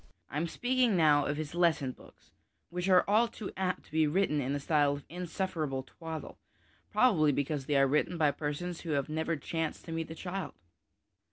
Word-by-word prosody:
I - - -3
am 165 +3 0
speaking 245 +2 +1
now 150 -3 +4
of 145 +1 -1
his 155 -1 -4
lesson 170 -6 +2
books, - - -18 0.4
which 180 +2 -2
are 185 -1 +6
all 215 +4 +4
too 220 -3 -7
apt 185 -1 -2
to - - -21
be 155 0 +3
written 150 -2 +1
in 135 +2 -1
a - - -1
style 145 -1 +2
of 145 0 -7
insufferable 170 -5 -3
twaddle, 160 +3 -8 0.5
probably 160 -12 +4
because 140 0 -2
they 145 - +1
are 135 - +6
written 150 +5 +1
by 150 -3 +4
persons 160 +4 -4
who 165 -3 -3
have 140 0 0
never 160 +2 -1
chanced 160 +2 -3
to 165 - -7
meet 165 0 -3
a 160 - -6
child. 185 +3 -5
160 Hz, 195 wpm, -31 LUFS, 145-180 Hz, 0.5 s, are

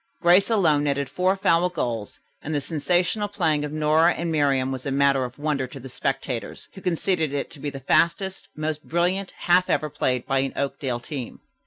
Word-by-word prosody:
Grace 180 +4 +5
alone 160 -10 +3
netted 140 -1 0
four 185 +1 +1
foul 180 -3 +2
goals, 115 - -4 0.2
and 155 - -3
the - - +2
sensational 175 +7 0
playing 160 -7 0
of 150 - -4
Nora 155 +1 +3
and 170 0 -2
Miriam 135 -4 +2
was 130 +1 -5
a - - -1
matter 140 -1 +3
of 125 0 -9
wonder 145 -3 -1
to 135 +2 -10
the 135 - -9
spectators, 130 -2 -3
who 190 - -11
conceded 170 -3 0
it 140 - -3
to 150 - -10
be 145 +1 -3
the 135 -1 -8
fastest, 185 +7 +1
most 155 0 -4
brilliant 180 +3 0
half 180 +1 +3
ever 155 -1 0
played 125 -4 -1
by 135 -1 +1
an 135 0 -1
Oakdale 135 -3 -2
team. 130 -2 -7
150 Hz, 195 wpm, -24 LUFS, 135-175 Hz, 0.2 s, Grace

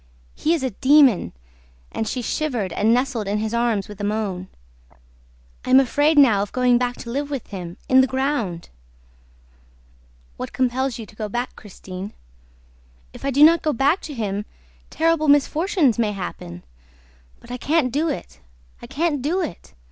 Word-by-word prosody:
"He 325 +2 +1
is 305 - -4
a 260 - -1
demon!" 265 - +4 0.6
And 220 - -3
she 250 +3 -3
shivered 235 - -2
and 215 +2 +2
nestled 245 -3 0
in 205 +1 0
his 215 +1 -3
arms 235 -4 0
with 210 -1 -10
a - - -4
moan. 205 -3 -2 1.2
"I - - -7
am 260 +1 +7
afraid 290 +4 +2
now 230 -8 +6
of 205 - -4
going 250 -1 +3
back 245 0 -1
to 235 - -7
live 285 +3 -2
with 275 -5 -4
him... 180 -4 -7
in 260 0 +6
the 260 - +2
ground!" 260 - -2 1.7
"What - - -6
compels 260 0 0
you 225 - -7
to 210 - -18
go 215 -1 -4
back, 240 +4 -3
Christine?" 190 -1 -9 1.0
"If - - -12
I 275 - 0
do 280 +2 +4
not 330 +1 +7
go 305 - 0
back 285 +9 +2
to 295 - -8
him, 205 -3 -3 0.4
terrible 325 -1 +1
misfortunes 290 - +2
may 215 -3 +1
happen!... 90 - -7 0.8
But - - -14
I 250 - -4
can't 285 -1 +1
do 305 +6 0
it, 65 - -6 0.4
I - - -9
can't 305 -2 -1
do 320 +8 0
it! 255 - -7
250 Hz, 170 wpm, -22 LUFS, 210-290 Hz, 1.7 s, am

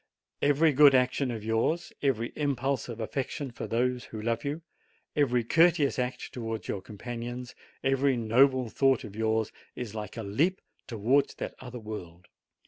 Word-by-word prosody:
Every 145 +2 +4
good 140 0 +7
action 125 +1 +2
of 115 -3 -4
yours, 115 +10 0
every 120 -5 +1
impulse 140 -3 -1
of 115 -1 -6
affection 130 +4 -3
for 120 - -6
those 125 +1 0
who 110 - -8
love 115 +1 -1
you, 150 +3 -3 0.5
every 125 -5 +2
courteous 160 +1 +4
act 125 0 -3
towards 115 -2 -4
your 100 - -3
companions, 120 +4 -6 0.3
every 135 -1 +2
noble 125 +3 +4
thought 135 +2 +2
of 105 -3 -9
yours, 110 0 0 0.2
is 120 -4 -5
like 105 0 -6
a 115 - -3
leap 150 - +1 0.3
towards 125 +5 +1
that - - -5
other 125 -1 -8
world. 90 -5 -8
125 Hz, 155 wpm, -29 LUFS, 110-140 Hz, 0.5 s, good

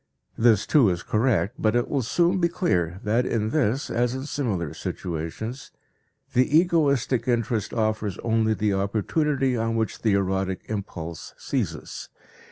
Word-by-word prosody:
This, 115 -3 +4
too, 135 -9 +5
is 85 -1 -2
correct, 110 0 +1
but 110 +1 +2
it 120 - +2
will 140 - 0
soon 175 - +2
be 170 - +3
clear 90 - 0
that 115 +4 +2
in 110 -3 -1
this, 135 -2 0
as 120 +1 +1
in 130 +1 -5
similar 105 - -2
situations, 90 - -5 0.6
the 130 +5 +4
egoistic 145 -8 +2
interest 115 -3 0
offers 110 -4 -1
only 110 -1 +2
the 105 -2 0
opportunity 130 +8 0
upon 115 -1 -1
which 110 -1 -2
the 110 -3 +2
erotic 95 -1 0
impulse 85 -6 -6
seizes. - - -4
115 Hz, 145 wpm, -25 LUFS, 100-130 Hz, 0.6 s, too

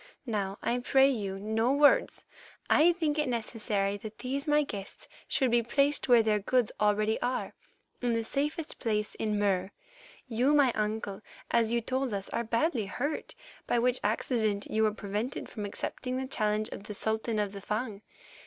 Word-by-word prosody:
Now, 200 -4 -2
I 245 - +1
pray 265 +2 +4
you, 200 -6 -3
no 220 +4 0
words. 295 - +4 0.5
I 330 +3 +6
think 315 -3 -1
it 300 - +1
necessary 215 -4 -1
that 215 +1 -9
these 275 +4 -3
my 295 0 +4
guests 200 -8 -8 0.2
should 260 -4 +1
be 240 0 +4 0.5
where 240 -3 +6
their 215 -1 +2
goods 240 +2 +1
already 210 +1 +2
are, 250 +1 -2 0.5
in 240 -2 +1
the 230 - 0
safest 295 +6 -2
place 210 -3 -1
in 215 -1 -1
Mur. 195 -2 +1 0.6
You, 250 +5 +2
my 280 -4 +5
uncle, 210 -2 -2 0.3
as 230 -1 +3
you 235 0 +2
told 260 -1 -1
us, 195 -1 -4
are 235 - -1
badly 230 - 0
hurt, 285 +9 -3 0.3
by - - +2
which 245 +1 +2
accident 215 -1 0
you 220 - +1
were 215 -1 +4
prevented 210 +4 -4
from 210 -3 -5
accepting 250 +5 -4
the 265 - -2
challenge 215 -4 0
of 200 - -8
the 210 -1 -6
Sultan 220 +2 -1
of 205 -2 0
the 200 0 -8
Fung. 210 0 -3
225 Hz, 170 wpm, -30 LUFS, 210-255 Hz, 0.6 s, I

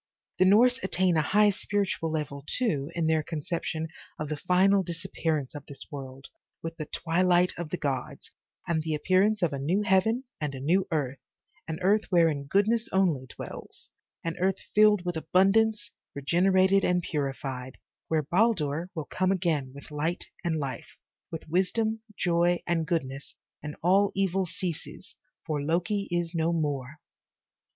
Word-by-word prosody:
The 185 - +6
Norse 245 +6 +5
attain 185 -5 +1
a 155 - +4
high 205 +7 +4
spiritual 200 -4 -1
level, 150 -3 -3
too, 155 - 0
in 170 -1 0
their 160 0 +3
conception 160 0 -3 0.3
of 155 -1 -4
the 155 - -1
final 185 +5 +3
disappearance 165 -5 -3
of 145 -2 -9
this 140 -2 -4
world, 135 -2 -8 0.4
with 165 0 -5
the 155 - -5
twi 165 +2 -1
light 180 0 +4
of 170 -2 -5
the 180 - -2
gods, 135 -5 -4 0.4
and 165 -2 +1
the 155 0 -2
appearance 190 +6 +2
of 165 - +1
a 140 - -3
new 175 +9 +1
heaven 210 +6 +2 0.2
and 150 -3 -3
a - - -6
new 175 +8 +2
earth, 140 -4 -1 0.5
an 160 -1 -4
earth 205 +4 +3
wherein 165 -6 +3
goodness 220 +7 +2
only 170 -9 +1
dwells, - - -10 0.3
an 165 -1 -3
earth 190 +1 +1 0.2
filled 210 -3 +5
with 175 -2 -2
abundance, 195 +3 +2 0.2
regenerated 185 +6 +3
and 180 -1 +2
purified, 135 -4 -4 0.3
where 160 -1 +1
Baldur 170 -2 +1
will 160 -3 -3
come 185 0 0
again 160 -8 0
with 140 +3 -12
light 160 +4 -2 0.2
and 170 -2 0
life, 140 -4 -5 0.3
with 165 -1 -7
wisdom, 215 +6 0 0.2
joy 175 0 +2
and 165 -2 0
goodness, 135 -5 -3 0.3
and 150 0 -6
all 195 +3 +4
evil 190 -1 +1
ceases, 170 0 -6 0.3
for 150 -2 -2
Loki 175 +7 0
is 175 -1 -1
no 165 0 +1
more. 145 -4 -2
170 Hz, 160 wpm, -28 LUFS, 150-190 Hz, 0.5 s, The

